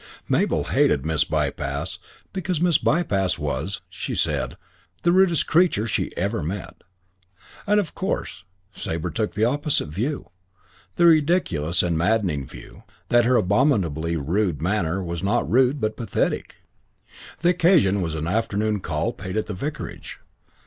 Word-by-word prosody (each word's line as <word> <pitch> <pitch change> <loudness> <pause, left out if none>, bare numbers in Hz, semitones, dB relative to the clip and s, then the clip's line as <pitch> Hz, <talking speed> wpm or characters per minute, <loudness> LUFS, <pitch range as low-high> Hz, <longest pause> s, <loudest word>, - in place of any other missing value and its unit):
Mabel - - +1
hated 70 -1 +2
Miss 80 -2 +2
Bypass - - -2 0.3
because 185 -3 -2
Miss 175 -2 +3
Bypass 100 - +1
was, 75 +5 -3
she 90 -2 -5
said, - - -1 0.5
the 175 - +4
rudest 185 -3 +4
creature 165 - +3
she 115 - -1
ever 100 +5 -1
met. 90 +6 -5 0.9
And 210 +1 +4
"of 190 -6 -3
course" 80 - -3 0.3
Sabre 85 +2 -3
took 110 -2 -2
the 105 +2 +2
opposite 145 - 0
view 120 - -3 0.7
the 175 - +4
ridiculous 145 - +3
and 85 -2 0
maddening 85 - +1
view - - -12 0.3
that 120 -1 +4
her 125 +1 +3
abominably 95 - +2
rude 85 +2 0
manner 90 +1 0
was 85 -1 -4
not 100 -7 +1
rude 130 - +3
but 110 -2 -2
pathetic. 115 - -2 0.9
The 175 - +4
occasion 165 - +3
was 80 -3 -2
an 80 0 -3
afternoon 105 +2 0
call 80 +7 -2
paid 95 -3 -6
at 110 - 0
the - - -5
vicarage. 145 +11 -6
105 Hz, 140 wpm, -23 LUFS, -, 0.9 s, the